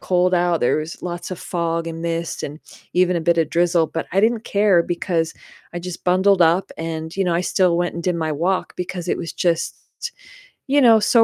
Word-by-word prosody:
cold 180 0 +2
out, 175 -1 +2
there 120 - +2
was 155 +2 -6
lots 175 0 -5
of 185 - -5
fog 165 -1 -2
and 165 0 -5
mist 170 0 -3
and 145 +2 -6 0.4
even 180 0 +3
a - - 0
bit 170 +1 +2
of 160 -2 +1
drizzle, 170 -1 +2
but 165 - -4
I 195 - +3
didn't 225 +1 +1
care 200 -4 +3
because 170 -1 -1 0.4
I 175 - -2
just 180 0 -7
bundled 185 +2 +3
up 170 +4 +3
and, 160 0 -4
you 195 - 0
know, 175 -2 +1
I 175 - +1
still 180 -2 +2
went 175 0 0
and 170 - -5
did 180 +1 0
my 160 -2 -1
walk 175 +6 -1
because 180 -1 -5
it - - -1
was 165 - -5
just, 170 -2 0 0.9
you 285 +2 +3
know, 230 -5 +7
so 225 +2 +5
175 Hz, 220 wpm, -21 LUFS, 165-185 Hz, 0.9 s, know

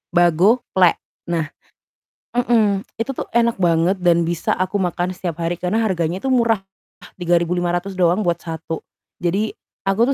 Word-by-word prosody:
Bago-plek 180 +2 +4 0.2
nah 165 -3 -2 0.9
mhm, 220 -5 +2 0.2
itu 230 - -1
tuh - - -3
enak 235 0 +2
banget 175 +1 +2
dan 175 -2 +3
bisa 170 0 0
aku 185 +2 -1
makan 180 -1 -1
setiap 175 -2 -5
hari 170 +1 -1
karena 185 +6 0
harganya 180 -4 -1
itu 270 - -1
murah, 230 -5 +3 0.6
Rp3.500 175 +1 0
doang 180 +2 +3
buat 175 -4 +1
1, 165 -1 -6 0.3
jadi 195 +5 0 0.3
aku 225 +7 +2
180 Hz, 135 wpm, -20 LUFS, 170-205 Hz, 0.9 s, Bago-plek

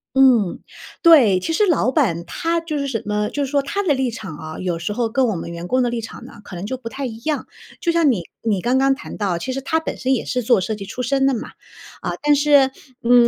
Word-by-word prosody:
嗯， 250 -8 +4 0.4
对。 265 - +7
其 325 - -2
实 420 - +3
老 300 - +2
板 200 - +1
他 335 - -1
就 315 -2 -3
是 280 -1 -2
什 230 -5 -2
么 210 0 -1
就 290 - -2
是 265 - -6
说 280 -1 +1
他 400 +9 -2
的 315 -8 +2
立 260 -2 0
场 190 -8 -7
啊， 155 0 -7
有 180 -2 -2
时 170 +5 -3
候 235 0 0
跟 260 +3 +2
我 220 -5 0
们 170 - -5
员 170 +1 -6
工 255 +4 +2
的 245 - +1
立 235 -1 -3
场 225 - -9
呢， - - -12
可 185 - -10
能 175 - -5
就 260 - -3
不 245 -2 -9
太 270 +4 -5
一 225 -2 -7
样。 295 +5 -2 0.3
就 340 - +2
像 330 -5 +4
你 200 - -1 0.2
你 205 -5 0
刚 250 +2 +2
刚 270 0 +4
谈 280 - -8
到， 190 -5 -1
其 260 - -4
实 270 - -2
他 320 +3 0
本 320 - -5
身 265 +1 +1
也 250 - 0
是 250 -2 -2
做 215 -5 +3
设 215 +4 -2
计 200 -1 -7
出 235 +5 -5
身 270 +2 +1
的 270 - +3
嘛， 235 - -4 0.5
啊， - - -2
但 295 0 +4
是， 285 -2 +5 0.3
嗯， 240 0 +6
250 Hz, 290 characters per minute, -21 LUFS, 210-280 Hz, 0.5 s, 对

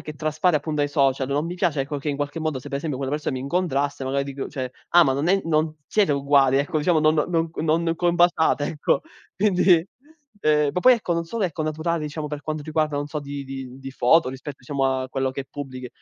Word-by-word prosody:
che 155 - -8
traspare 155 +2 +1
appun 150 +1 -3
dai 145 -1 +1
social, 135 -2 +1
non 145 +3 0
mi 175 - -4
piace, 160 -6 0
ecco, 145 +1 -4
che 140 - -4
in 145 - -1
qualche 145 +3 -3
modo, 155 -4 -1
se 125 - -13
per 140 - -2
esempio 145 -3 -3
quella 135 0 -3
persona 150 -3 -2
mi - - -4
incontrasse, 145 -3 -1
magari 135 +1 -1
dico, 140 0 -5
cioè: 130 -3 -5 0.2
"Ah 175 0 +6
ma 135 - +2
non 140 +5 -1
è 195 +1 +3
non 155 -1 +1
siete 205 -6 +2
uguali", 140 -1 +3
ecco, 145 +3 0
diciamo. 160 +2 +2
"Non 155 0 +4
no 165 +1 0
non 165 +1 +1
combaciate," 175 -3 +2
ecco; 150 0 0 0.3
quindi 185 -4 +4 0.5
ehm, 150 -3 +3
ma 180 - -1
poi 255 - +7
ecco, 215 -7 -2
non 170 - 0
solo 215 +5 -2
ecco 165 -3 -2
naturale, 155 +2 -1
diciamo, 150 0 -4
per 145 0 -6
quanto 155 0 -4
riguarda, 155 -1 0
non 145 0 -2
so, 150 0 -4
di 140 0 -6
di 135 -1 -8
di 135 0 -8
foto 135 +5 +4
rispetto 135 +2 -7
diciamo 135 +1 -2 0.2
a 130 - -6
quello 135 0 -1
che 135 +1 -5
pubblichi, 130 -3 -7
150 Hz, 230 wpm, -23 LUFS, 140-165 Hz, 0.5 s, poi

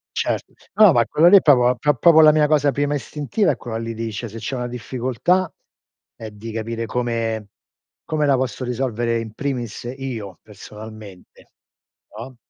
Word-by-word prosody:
Certo. - - -2 0.2
No, 210 -4 +7
ma 120 -4 +3
quello 165 +7 +3
lì 200 - +9
è - - +4
proprio 125 -4 +4
pro 150 +2 +1
proprio 160 +5 +6
la 155 0 +8
mia 150 -1 +3
cosa 145 -2 +2
prima 145 +1 -1
istintiva 150 - -1
è - - -3
quella 115 -2 -6
lì 115 0 -5
di 115 0 -5
cioè 115 +3 -5
se 110 +2 -10
c'è 125 +5 -4
una 125 -1 -3
difficoltà 130 +9 -1 0.6
è 110 -1 -8
di 110 +2 -9
capire 115 +1 -4
come 115 -2 -2 0.6
come 155 -2 -1
la 140 -1 +3
posso 130 0 -3
risolvere 120 -2 -1
in 110 -1 -7
primis 125 -6 -4
io 115 -8 -6
personalmente, 105 -1 -13 0.7
no? 130 +2 -9
120 Hz, 175 wpm, -21 LUFS, 115-145 Hz, 0.7 s, lì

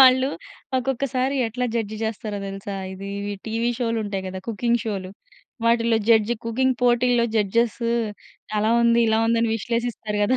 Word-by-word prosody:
వాళ్ళు 260 0 +7 0.5
ఒక్కొక్కసారి 260 +1 0
ఎట్లా 250 +3 -2
జడ్జ్ 220 -2 -1
చేస్తారో 215 -1 -3
తెలుసా? 195 +1 -5 0.2
ఇది 195 +1 -7 0.4
టీవీ 230 +2 0
షోలు 230 -2 0
ఉంటాయి 195 -2 -3
కదా! 190 0 -5
కుకింగ్ 235 +2 +1
షోలు. 195 -4 -3 0.5
వాటిలో 230 -1 +3
జడ్జ్, 225 0 +5
కుకింగ్ 255 +2 +1
పోటీల్లో 240 0 +4
జడ్జెస్ 220 +3 +1 0.8
అలా 215 +2 +2
ఉంది, 235 0 +4
ఇలా 220 0 +3
ఉంది 230 0 +3
అనే 230 - +1
విశ్లేషిస్తారు 230 -2 -2
కదా! 255 +5 +2
230 Hz, 145 wpm, -23 LUFS, 210-240 Hz, 0.8 s, వాళ్ళు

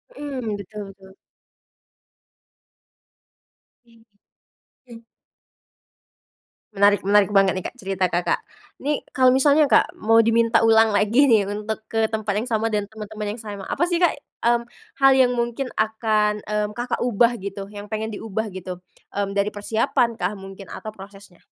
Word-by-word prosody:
Mhm, 255 - -4
betul 205 +2 -8
betul. 190 0 -18 2.7
Iya, 230 -1 -23 0.9
mmm. 230 -1 -12 1.7
Menarik, 200 0 +4
menarik 205 0 +4
banget 195 -2 +4
nih, 185 - -4
Kak, - - -7
cerita 190 -3 -1
Kakak. 175 +1 0 0.4
Ini, 295 +1 0 0.2
kalo 255 -1 +5
misalnya 285 +3 +4
Kak, - - +3
mau 225 +1 +4
diminta 230 0 +3
ulang 225 -1 +5
lagi 215 +7 +3
nih 220 -7 +4
untuk 210 +1 -4
ke 225 0 0
tempat 215 -2 -2
yang 250 - -7
sama 220 0 0
dan 210 -2 -1
teman-teman 215 -1 -6
yang - - -11
sama. 205 -2 -7
Apa 345 - +1
sih, 350 - 0
Kak, 350 - +5 0.3
mmm, 235 0 +3 0.4
hal 270 0 +6
yang 255 -2 +4
mungkin 240 +2 -2
akan, 215 -1 +1
mmm, 210 0 -1
Kakak 245 +1 -3
ubah 240 -1 +3
gitu, 195 +1 -7
yang 205 0 -9
pengen 220 +1 -4
diubah 220 0 -4
gitu, 185 -1 -8 0.3
mmm, 200 0 -1
dari 200 +1 0
persiapan 220 +3 0
kah 210 - -1
mungkin 195 0 -11
atau 215 - -8
prosesnya? 195 -2 -14
215 Hz, 150 wpm, -22 LUFS, 200-230 Hz, 2.7 s, hal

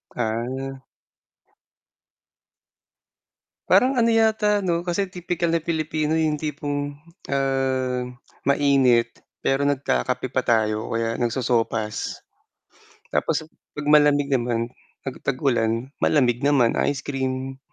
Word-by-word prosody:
Ah. 130 +4 -3 2.9
Parang 260 +1 +4
ano 230 - +4
yata 220 -2 +3
'no, 170 -1 0
kasi 185 +2 0
tipikal 175 -1 -2
na 165 - +2
Pilipino 155 -1 -1
yung 155 -2 +1
tipong, 145 -1 -3 0.3
ah, 130 -2 0 0.4
mainit, 135 -4 +3 0.2
pero 135 +1 +1
nagkakape 130 - -1
pa - - +1
tayo 110 -2 +1
o - - -7
kaya 115 0 -1
nagsosopas. 115 -3 -1 0.9
Tapos 155 - 0
a - - -13 0.3
'pag 150 0 -5
malamig 145 -1 +5
naman, 120 -2 0 0.3
'pag 135 - -6
tag-ulan, 120 -3 0
malamig 125 -5 +3
naman, 135 -5 +3
ice 140 -2 -1
cream. 130 -1 -3
135 Hz, 105 wpm, -23 LUFS, 120-155 Hz, 2.9 s, malamig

